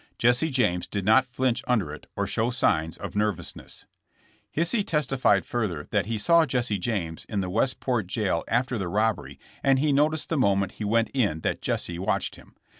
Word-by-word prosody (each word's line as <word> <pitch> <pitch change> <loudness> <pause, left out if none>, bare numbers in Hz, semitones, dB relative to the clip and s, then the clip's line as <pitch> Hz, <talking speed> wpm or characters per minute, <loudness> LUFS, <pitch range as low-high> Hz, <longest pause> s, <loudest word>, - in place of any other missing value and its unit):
Jesse 125 +7 +3
James 105 - +1
did 100 -2 -3
not 110 +5 +5
flinch 130 -1 -1
under 105 -12 +1
it 75 - -11
or - - -1
show 115 +2 0
signs 80 -10 0
of - - -6
nerv 105 -1 +1
ousness. - - -10 0.7
Hisey 175 +7 +2
testified 135 - +1
further 95 -12 -2
that 100 -3 +1
he 115 -1 -1
saw 165 +8 +4
Jesse 120 -5 -1
James 90 -7 -3
in 105 -3 -1
the 90 -1 -4
Westport 120 -1 0
jail 95 -4 -1
after 120 0 0
the 95 - -2
robbery 100 -8 -1 0.2
and 135 -1 +3
he 145 +1 +2
noticed 150 +2 +1
the 165 - 0
moment 100 -6 +2
he - - 0
went 115 +2 +2
in 105 - 0
that - - -2
Jesse 85 -1 -2
watched 95 - -1
him. - - -17
110 Hz, 190 wpm, -26 LUFS, 95-130 Hz, 0.7 s, not